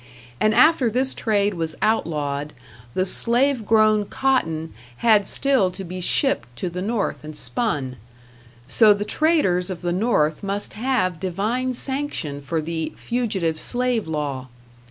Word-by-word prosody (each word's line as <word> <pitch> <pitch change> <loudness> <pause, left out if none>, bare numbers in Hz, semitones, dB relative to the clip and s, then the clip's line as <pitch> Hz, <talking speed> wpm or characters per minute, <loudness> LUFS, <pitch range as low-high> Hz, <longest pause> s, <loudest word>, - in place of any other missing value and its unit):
And 215 0 +2
after 280 -1 +5
this 260 +4 +1
trade 205 -2 0
was 165 -3 -3
outlawed, 150 -9 -1 0.4
the 185 - +1
slave 240 +3 +2
grown 215 -1 +4
cotton 165 -12 -1 0.2
had 215 -4 +4
still 265 -9 +3
to 190 +2 -8
be 180 +1 -6
shipped 270 - +1
to 175 +8 -4
the 180 +1 -4
North 210 -3 -2
and 155 0 -8
spun; 145 - -2 0.7
so 210 - +5
the 205 +1 -4
traders 250 - +1
of 185 -2 -6
the 175 0 0
North 180 -7 +1
must 200 0 -3
have 215 -7 -1
divine 220 +8 -2
sanction 265 - -3
for 160 +3 -2
the 160 0 -3
Fugitive 200 -10 -2
Slave 245 -3 -1
law. 145 -4 -3
200 Hz, 140 wpm, -22 LUFS, 165-240 Hz, 0.7 s, after